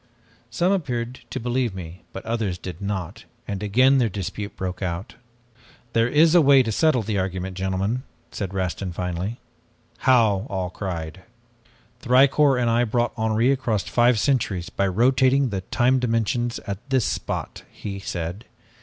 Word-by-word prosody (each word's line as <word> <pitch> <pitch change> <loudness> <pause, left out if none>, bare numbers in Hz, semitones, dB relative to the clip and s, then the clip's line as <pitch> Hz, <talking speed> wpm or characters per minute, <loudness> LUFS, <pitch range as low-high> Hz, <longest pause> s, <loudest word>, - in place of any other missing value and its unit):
Some 170 +11 +1
appeared 125 -9 -2
to 130 - -4
believe 120 -3 -1
me 90 -1 -8
but 95 - -8
others 110 -6 -1
did 90 +1 -8
not, 95 -4 -4 0.2
and 100 -1 -4
again 130 +6 +4
their 120 -3 +2
dispute 100 +2 -5
broke 90 0 -4
out. 90 0 -4 0.8
"'There 115 0 +3
is 155 +5 +4
a 175 - +7
way 140 -2 +6
to 115 - -2
settle 130 0 +2
the 105 -1 -1
argument, 95 0 -3
gentlemen,' 95 +6 -1 0.3
said 100 -3 -4
Rastin 95 -1 -3
finally. 90 +6 -3 0.6
"'How?' 115 -5 +3
all 95 -2 -3
cried. 90 -3 -5 0.8
"'Thicourt 135 +1 +4
and 120 - +1
I 120 +1 +3
brought 120 +1 0
Henri 110 +3 +2
across 115 -7 0
five 120 +2 +3
centuries 105 -9 0
by 100 - 0
rotating 130 +6 +3
the 95 -3 -3
time 130 +2 +3
dimensions 120 0 0
at 100 -1 -4
this 130 -5 +2
spot,' - - -3
he 100 -1 -7
said. 90 +3 -5
110 Hz, 155 wpm, -23 LUFS, 95-125 Hz, 0.8 s, a